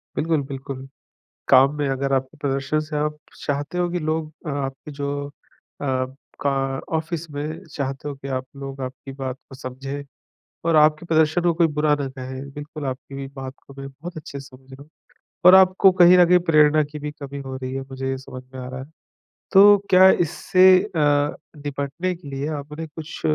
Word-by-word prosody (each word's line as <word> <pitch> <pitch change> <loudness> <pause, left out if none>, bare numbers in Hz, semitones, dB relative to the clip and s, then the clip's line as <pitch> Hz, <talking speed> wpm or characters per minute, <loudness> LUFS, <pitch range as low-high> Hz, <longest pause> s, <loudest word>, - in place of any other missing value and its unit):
बिल्कुल, 160 -1 +1
बिल्कुल। 135 -1 -7 0.6
काम 135 +2 +6
में 145 -1 0
अगर 135 +1 -1
आप 135 0 +1
प्रदर्शन 135 +1 0
से 155 0 -5
आप 150 0 -1 0.2
चाहते 145 +4 -3
हो 175 0 +1
कि 175 +1 -2
लोग 155 0 -2
आपके 140 0 -4
जो 140 0 -4 0.2
अ, 135 -2 -5 0.4
का 140 - +2 0.5
ऑफ़िस 160 0 -4
में 150 +3 -5
चाहते 135 +1 -4
हो 145 - -6
कि 135 0 -9
आप 130 0 -3
लोग 135 0 -7
आपकी 130 +2 -7
बात 135 -1 -5
को 135 - -10
समझें 135 +2 -6 0.6
और 165 -1 +3
आपके 155 +2 +4
प्रदर्शन 160 +1 +3
को 175 0 +3
कोई 170 0 +4
बुरा 150 0 +4
ना 140 - -2
कहे। 130 0 -7
बिल्कुल, 150 +1 -8
आपकी 135 +1 -5
बात 135 -1 -7
को 140 - -13
मैं 135 0 -6
बहुत 155 +6 -10
अच्छे 145 -2 -7
से - - -11
समझ 130 0 -17
रहा 135 +1 -10
हूँ 145 - -18 0.6
और 180 +1 +10
आपको 190 0 +6
कहीं 175 +1 +8
न 180 - +7
कहीं 180 +1 +6
प्रेरणा 155 -1 +5
की 150 +1 -8
भी 150 0 -4
कमी 140 0 -6
हो 130 0 -5
रही 130 0 -5
है, 135 - -3
मुझे 135 0 -5
ये 135 - -1
समझ 130 -1 -10
में 130 - -7
आ 125 - -6
रहा 130 0 -6
है। 135 - -11 0.6
तो 205 +1 +8
क्या 185 0 +8
इससे 185 +2 +3 0.2
अ, 150 -7 +1 0.2
निपटने 145 +5 -3
के 170 -3 -13
लिए 135 +1 -3
आपने 150 +3 -7
कुछ 155 +1 -9
145 Hz, 195 wpm, -23 LUFS, 135-155 Hz, 0.6 s, और